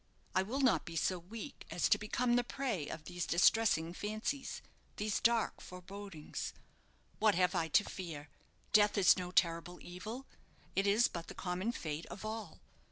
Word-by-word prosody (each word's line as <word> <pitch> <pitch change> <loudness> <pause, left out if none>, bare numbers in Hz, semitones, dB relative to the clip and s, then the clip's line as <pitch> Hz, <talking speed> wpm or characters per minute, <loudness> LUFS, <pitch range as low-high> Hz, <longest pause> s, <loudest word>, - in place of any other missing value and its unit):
I 185 - +4
will 240 +9 -2
not 255 -3 +4
be 165 - -8
so 180 +2 +1
weak 225 - -9
as 175 - +1
to - - +5
become 240 +3 +1
the 245 - +3
prey 240 - -2
of 160 - -6
these 175 +2 -4
distressing 175 -2 +4
fancies, 215 +8 -3 0.3
these 210 0 0
dark 235 -1 +2
forebodings. 180 -3 -7 0.7
What 215 -1 +4
have 180 0 +3
I 165 - +1
to 145 -3 +4
fear? 160 -6 -6 0.5
Death 210 0 +5
is 190 -3 +7
no 180 -1 -4
terrible 170 -1 +1
evil. 215 +9 -7 0.5
It 195 +1 +2
is 215 +4 +5
but 170 -1 -6
the - - -8
common 185 +4 -1
fate 155 -7 -4
of 210 - -8
all. 215 -5 -5
195 Hz, 165 wpm, -35 LUFS, 175-220 Hz, 0.7 s, is